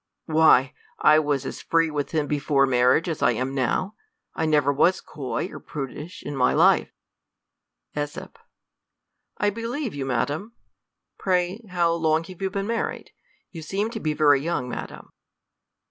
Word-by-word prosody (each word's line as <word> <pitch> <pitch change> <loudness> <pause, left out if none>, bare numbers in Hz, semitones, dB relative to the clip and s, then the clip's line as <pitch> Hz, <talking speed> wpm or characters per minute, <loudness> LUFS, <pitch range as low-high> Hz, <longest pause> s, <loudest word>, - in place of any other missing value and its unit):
Why, 155 -5 +4 0.2
I 155 0 +5
was 145 -3 -1
as - - -6
free 165 -1 +1
with 145 -2 -2
him 155 -3 0
before 145 -1 +2
mar 125 -2 +2
riage 165 - -10
as 160 -3 -3
I 120 - +4
am 130 +4 -3
now; 135 - -1 0.4
I 160 - -1
never 145 -2 +3
was 180 +6 +3
coy 145 +3 -4
or - - -8
prudish 150 +3 -7
in 145 - -5
my 125 -2 +3
life. - - +4 1.1
,^8. 145 0 -4 1.1
I 205 - +1
believe 230 +4 -4
you, 135 -2 -4
madam; 145 - -2 0.7
pray, 185 +2 0
how 170 -2 +2
long 160 -1 +1
have 185 +2 -12
you 190 - 0
been 195 0 -3
married? 230 +1 -3 0.4
you 165 - -8
seem 200 +7 -2
to 225 - -5
be 155 -5 -1
very 145 -3 +4
young, 155 -5 -2
madam. - - -7
155 Hz, 160 wpm, -24 LUFS, 140-180 Hz, 1.1 s, I